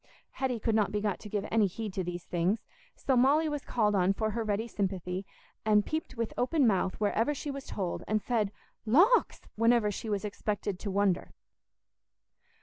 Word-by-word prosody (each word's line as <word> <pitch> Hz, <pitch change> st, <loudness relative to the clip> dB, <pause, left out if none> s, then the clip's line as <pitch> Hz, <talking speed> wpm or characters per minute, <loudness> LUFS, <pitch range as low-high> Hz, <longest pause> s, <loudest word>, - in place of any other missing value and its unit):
Hetty 255 Hz, -3 st, -2 dB
could 225 Hz, +1 st, 0 dB
not 210 Hz, -2 st, +2 dB
be 210 Hz, -, 0 dB
got 205 Hz, -2 st, -1 dB
to 210 Hz, -, -9 dB
give 205 Hz, 0 st, -2 dB
any 220 Hz, -2 st, +4 dB
heed 210 Hz, +2 st, -5 dB
to 190 Hz, -, -2 dB
these 175 Hz, 0 st, -5 dB
things, 180 Hz, +6 st, 0 dB, 0.3 s
so 265 Hz, -, 0 dB
Molly 280 Hz, +6 st, +4 dB
was 295 Hz, -2 st, -3 dB
called 210 Hz, -3 st, +1 dB
on 190 Hz, -1 st, +3 dB
for 220 Hz, +2 st, -1 dB
her 230 Hz, +2 st, -2 dB
ready 215 Hz, +1 st, -1 dB
sympathy, 190 Hz, -3 st, -3 dB, 0.4 s
and 210 Hz, -1 st, +4 dB
peeped 315 Hz, -4 st, -3 dB
with 230 Hz, -1 st, -2 dB
open 275 Hz, +3 st, +2 dB
mouth 190 Hz, -4 st, +1 dB
wherever 225 Hz, +7 st, +1 dB
she 290 Hz, +1 st, -4 dB
was 275 Hz, 0 st, -7 dB
told, 185 Hz, -4 st, -3 dB
and 215 Hz, 0 st, +2 dB
said 215 Hz, -3 st, 0 dB, 0.3 s
"Lawks!" 350 Hz, -, +4 dB, 0.2 s
whenever 230 Hz, -1 st, +4 dB
she 220 Hz, +2 st, -5 dB
was 205 Hz, 0 st, -1 dB
expected 205 Hz, -2 st, -3 dB
to 205 Hz, -, -4 dB
wonder. 195 Hz, -2 st, +1 dB
215 Hz, 185 wpm, -30 LUFS, 200-235 Hz, 0.4 s, any